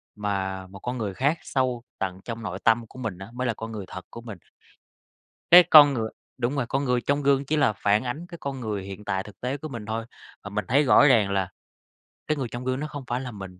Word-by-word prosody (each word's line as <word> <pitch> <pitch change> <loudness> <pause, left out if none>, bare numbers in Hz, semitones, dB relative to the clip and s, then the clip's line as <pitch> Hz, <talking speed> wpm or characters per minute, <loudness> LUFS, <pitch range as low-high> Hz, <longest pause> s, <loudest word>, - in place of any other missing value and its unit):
Mà 95 -2 -3
một 100 +1 -12
con 125 +4 -4
người 105 -4 -3
khác 140 - +1
sâu 125 -3 -1 0.2
tận 95 0 -3
trong 115 -1 -5
nội 90 -4 -4
tâm 115 0 +3
của 130 - -13
mình 110 -7 -4
á, 95 - -8
mới 125 0 -2
là 115 - +1
con 110 +1 -7
người 105 -3 -6
thật 95 - -8
của 115 - -9
mình. 110 -4 -8 1.1
Cái 180 +1 +11
con 145 -2 +9
người 110 -3 -2 0.3
đúng 125 +3 -1
rồi, 135 - 0
con 140 +1 0
người 125 -1 +1
trong 145 +2 0
gương 140 0 +3
chỉ 155 +2 0
là 110 -7 +3
phản 105 +2 +2
ánh 130 +7 -4
cái 170 -2 -9
con 135 -2 -4
người 105 -5 -3
hiện 100 +2 -9
tại 95 0 -1
thực 105 -2 -14
tế 130 +3 -2
của 155 - -7
mình 115 -6 -7
thôi, 115 +1 -3 0.4
và 100 - -6
mình 105 +1 -3
thấy 140 +5 +4
rõ 145 +2 +6
ràng 110 -6 +4
là 95 -1 0 0.8
cái 155 -1 0
người 130 -3 -2
trong 120 +1 -5
gương 130 +1 -1
nó 155 - -3
không 145 -2 -7
phải 125 +2 -1
là 125 -2 -6
mình. 95 -3 -9
120 Hz, 255 wpm, -25 LUFS, 100-135 Hz, 1.1 s, Cái